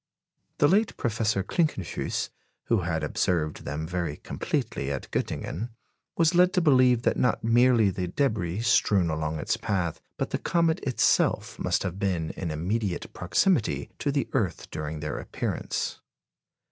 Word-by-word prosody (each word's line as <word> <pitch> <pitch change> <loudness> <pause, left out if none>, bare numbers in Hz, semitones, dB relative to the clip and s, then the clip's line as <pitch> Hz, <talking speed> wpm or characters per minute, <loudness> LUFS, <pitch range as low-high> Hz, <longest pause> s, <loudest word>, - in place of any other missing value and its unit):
The 145 - +5
late 200 +7 +2
Professor 110 -3 0
Klinkerfues, 150 - -1 0.3
who 115 - +2
had 85 -3 -2
observed 75 -4 -1
them 75 +2 -3
very 85 -3 -3
completely 70 0 -3
at 65 - -5
Göttingen, 115 - -3 0.5
was 165 0 +4
led 180 +1 +5
to - - +3
believe 130 -6 +4
that - - +2
not 125 - +1
merely 115 -2 +4
the 90 0 -3
débris 105 - -1
strewn 100 -5 +3
along 80 0 -2
its 115 +9 -1
path, 95 -8 -2 0.2
but - - -2
the - - -1
comet 165 -2 +1
itself 130 -3 +2
must - - 0
have 95 0 -4
been 90 -5 -1
in 90 - -5
immediate 90 +5 -2
proximity 110 - +1
to 145 - 0
the 140 -1 0
earth 105 -10 -1
during 75 0 -4
their 75 -5 -3
appearance. - - -3
100 Hz, 145 wpm, -27 LUFS, 85-125 Hz, 0.5 s, The